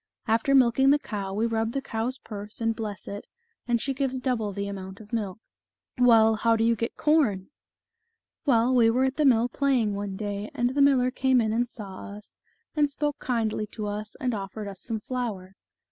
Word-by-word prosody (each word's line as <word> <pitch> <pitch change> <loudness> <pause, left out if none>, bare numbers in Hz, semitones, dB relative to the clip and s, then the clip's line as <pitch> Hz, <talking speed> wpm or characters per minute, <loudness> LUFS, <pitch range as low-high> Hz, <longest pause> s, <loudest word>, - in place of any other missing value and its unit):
After 230 +5 +3
milking 265 +1 +5
the 285 - +6
cow, 205 -9 -5
we 220 +3 +1
rub 225 0 -1
the 275 - 0
cow's 235 +2 -3
purse 210 -3 -8
and 225 -1 0
bless 215 -3 -6
it, 200 0 -7 0.4
and 240 -1 +2
she 270 +4 -1
gives 260 -1 -1
double 245 -5 -1
the 200 +1 -4
amount 190 -1 -7
of 215 +1 -14
milk." 205 -5 -2 0.4
" - - -55
Well, 225 -3 +6
how 230 +1 +3
do 225 - +1
you 230 0 +3
get 230 +2 -4
corn? 280 -12 +2 0.5
" 450 0 -55
"Well, 245 -1 +4
we 235 -3 +5
were 250 +3 +2
at 265 0 -2
the 305 - +2
mill 240 -3 +5
playing 250 -5 +1
one 200 -1 -4
day, 205 0 -4
and 245 +1 +1
the 285 - +2
miller 260 -3 +4
came 260 0 +2
in 220 -2 +1
and 240 +1 0
saw 200 -3 -8
us, 210 - -15 0.4
and 295 -2 +3
spoke 290 +1 -2
kindly 220 -3 -1
to 215 - -4
us, 210 +1 -5
and 250 -2 -1
offered 205 +1 -5
us 195 -2 -8
some 225 -2 -3
flour. 210 -7 -4
230 Hz, 205 wpm, -26 LUFS, 210-255 Hz, 0.5 s, the